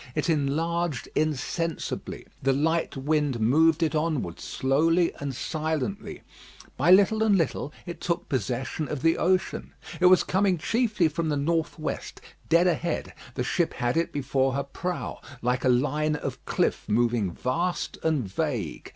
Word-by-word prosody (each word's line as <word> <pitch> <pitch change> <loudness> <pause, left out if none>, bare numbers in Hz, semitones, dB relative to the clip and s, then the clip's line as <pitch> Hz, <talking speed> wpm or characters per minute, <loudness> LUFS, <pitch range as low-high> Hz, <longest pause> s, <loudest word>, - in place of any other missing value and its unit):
It 170 - +1
enlarged 160 +1 -1
insensibly. 155 +2 -2 0.2
The 135 0 +2
light 160 +2 0
wind 145 -2 0
moved 160 +8 +4
it 155 - +1
onward 150 - -1
slowly 165 +6 +1
and 140 -2 -4
silently. 160 - -3 0.5
By - - +1
little 200 +4 +6
and 215 -3 +4
little 155 -3 -1
it 175 -2 -7
took 170 -1 -2
possession 130 +5 -2
of 150 -3 -4
the 165 0 +3
ocean. 185 +2 0 0.2
It 180 - +6
was 185 0 +6
coming 190 -1 +2
chiefly 215 0 +1
from 160 +1 -2
the 145 - 0
north 160 +3 0
west, 155 - -5 0.3
dead 170 +2 +5
ahead: 175 -1 -1 0.2
the - - -1
ship - - 0
had 120 0 0
it 165 +1 +1
before 135 -1 0
her 140 +1 -1
prow, 175 +6 -4 0.2
like 125 +1 0
a 130 - +3
line 150 +4 +2
of 150 - -5
cliff - - 0
moving 115 -2 +2
vast 170 - -2
and 150 -9 0
vague. 115 - -3
155 Hz, 150 wpm, -26 LUFS, 135-170 Hz, 0.5 s, little